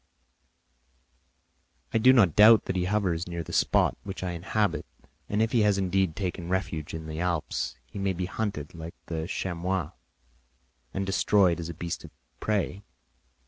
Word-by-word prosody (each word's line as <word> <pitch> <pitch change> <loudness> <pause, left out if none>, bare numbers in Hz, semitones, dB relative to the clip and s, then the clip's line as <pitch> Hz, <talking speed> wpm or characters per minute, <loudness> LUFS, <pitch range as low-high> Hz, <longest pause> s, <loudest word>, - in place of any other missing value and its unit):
"I 115 - +3
do 130 +4 +7
not 105 - +5
doubt 110 +1 +8
that 95 - -2
he 90 -1 +1
hovers 90 -4 0
near 85 -1 -4
the - - -9
spot - - +3
which 95 -1 -6
I 90 - -2
inhabit, 95 +5 -1 0.5
and 105 +2 +2
if 115 - -1
he 120 - +3
has 105 -2 +3
indeed 95 -3 +1
taken 90 -2 -3
refuge 80 -5 -2
in 80 -1 -6
the 80 0 -5
Alps, 85 -3 -1
he - - -9
may 95 -1 0
be 90 0 -3
hunted 95 -7 -4
like 80 0 -8
the 80 -1 -3
chamois 90 -2 -2 1.0
and 95 0 -2
destroyed 95 -2 +3
as 85 0 -5
a 85 - -6
beast 85 +1 -4
of - - -10 0.3
prey. 100 -2 -1
95 Hz, 165 wpm, -27 LUFS, 85-100 Hz, 1.0 s, doubt